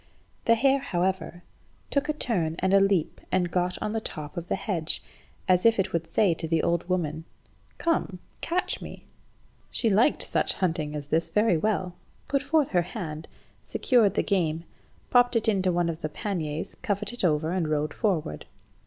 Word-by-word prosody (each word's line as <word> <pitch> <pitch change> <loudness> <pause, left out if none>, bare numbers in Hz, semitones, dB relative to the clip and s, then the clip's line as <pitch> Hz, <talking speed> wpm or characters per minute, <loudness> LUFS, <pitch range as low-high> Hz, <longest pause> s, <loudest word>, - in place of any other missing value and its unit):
The 230 - +5
hare, 270 +4 +3
however, 185 -4 -2 0.5
took 285 +1 0
a - - +2
turn 180 - -1
and 190 +1 +1
a 195 - +7
leap 195 -5 +1
and 180 -2 +1
got 180 0 0
on 210 - -1
the 225 - -1
top 150 -4 -6
of 170 -1 -5
the - - 0
hedge, 185 -5 -1 0.4
as 180 -1 +4
if 230 -1 +5
it 195 - 0
would 170 -1 -1
say 200 -5 +3
to 165 0 -5
the 160 -1 +1
old 170 +1 0
woman 160 -3 -1 0.5
"Come, 330 - 0 0.2
catch 355 +2 -1
me." - - -9 0.6
She 230 - +3
liked 220 +9 +3
such - - +1
hunting 160 -5 -1
as 145 -1 -4
this 165 +1 +1
very 210 +1 +3
well, 185 0 0 0.3
put 275 -1 +1
forth 290 0 +2
her 180 -2 +3
hand, 165 -5 -6 0.3
secured 235 -7 +2
the - - +2
game, 165 -5 0 0.5
popped 245 0 +5
it 230 0 +2
into 190 -4 +2
one 175 0 +1
of 165 0 -4
the 155 - -2
panniers, 160 -4 -3
covered 205 +1 -1
it 240 - -6
over, 160 -1 +2
and 180 -3 0
rode 150 0 -1
forward. 170 - -1
185 Hz, 180 wpm, -27 LUFS, 165-220 Hz, 0.6 s, a